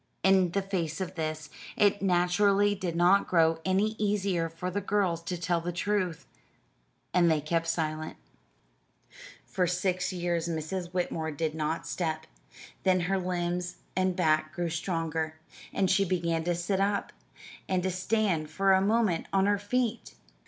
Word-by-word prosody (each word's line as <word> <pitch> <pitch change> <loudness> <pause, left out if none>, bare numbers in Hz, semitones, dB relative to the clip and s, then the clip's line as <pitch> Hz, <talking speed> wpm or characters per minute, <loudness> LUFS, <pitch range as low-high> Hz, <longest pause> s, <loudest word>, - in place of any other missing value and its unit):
In 190 -2 +5
the 195 +3 -1
face 175 -5 -2
of 190 -2 -4
this, 155 -2 -4 0.3
it 205 -1 +3
naturally 195 +2 +3
did 185 -4 -3
not 180 +4 +4
grow 165 -2 +3
any 190 +3 +2
easier 200 -5 0
for 165 +3 -5
the 205 +3 -2
girls 190 -4 0
to 180 +1 -4
tell 175 0 0
the 175 +1 -3
truth 180 -2 -1 0.9
and 175 -2 +4
they 160 -1 +3
kept 165 +2 -1
silent. 155 -1 -2 1.3
For 180 -1 0
six 180 +1 0
years 175 -2 -1
Mrs. 170 +2 -3
Whitmore 175 -3 -2
did 155 +1 -2
not 160 +1 -2
step; 160 -3 -2 0.6
then 185 -1 +3
her 190 +2 0
limbs 180 -1 -2 0.2
and 185 0 +1
back 155 -3 +1
grew 175 -1 -2
stronger, 165 -2 -2 0.4
and 190 - +1
she 190 +2 +3
began 170 -3 0
to 175 0 +1
sit 180 +3 -1
up, 200 0 0 0.6
and 185 -1 +1
to 190 - 0
stand 185 -4 0
for 195 +5 +3
a 190 - +4
moment 205 -4 +1
on 195 0 +3
her 205 0 +2
feet. 230 +2 -2
180 Hz, 155 wpm, -29 LUFS, 165-195 Hz, 1.3 s, In